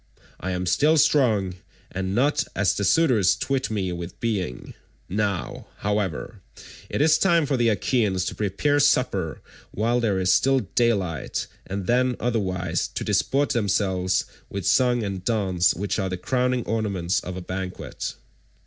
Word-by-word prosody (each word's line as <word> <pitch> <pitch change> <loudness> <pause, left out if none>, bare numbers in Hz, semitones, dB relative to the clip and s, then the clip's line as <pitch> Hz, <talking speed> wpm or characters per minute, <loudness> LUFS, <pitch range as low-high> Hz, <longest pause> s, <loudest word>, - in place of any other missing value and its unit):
I 95 - -4
am 90 0 -2
still 150 - +3
strong, 110 -12 +3 0.3
and 95 +1 -3
not 140 +4 +2
as 95 -2 +2
the 100 - -2
suitors 110 - +4
twit 135 -1 -1
me 100 -4 -2
with 85 0 -7
being. 95 - -3 0.3
Now, 100 -2 -2
however, 105 -5 -2 0.5
it - - -1
is 155 +1 +4
time 170 -4 +3
for 140 - 0
the 120 -2 +3
Achaeans 105 -4 +1
to - - -3
prepare 110 +9 0
supper 125 - +1 0.3
while 115 +4 0
there 105 -5 +1
is 95 0 +3
still 135 0 +3
daylight, 100 -7 -1 0.2
and 100 0 -4
then 125 +2 +2
otherwise 90 -7 -1
to - - -5
disport 140 +1 +1
themselves 95 -4 +1 0.2
with 100 -2 -5
song 125 -2 +3
and 95 -3 -4
dance 95 -6 +2
which 100 +2 -2
are 95 - -1
the 90 - -3
crowning 125 +4 0
ornaments 100 -5 -1
of 90 0 -6
a - - -5
banquet." 90 +1 -5
100 Hz, 150 wpm, -24 LUFS, 95-125 Hz, 0.5 s, suitors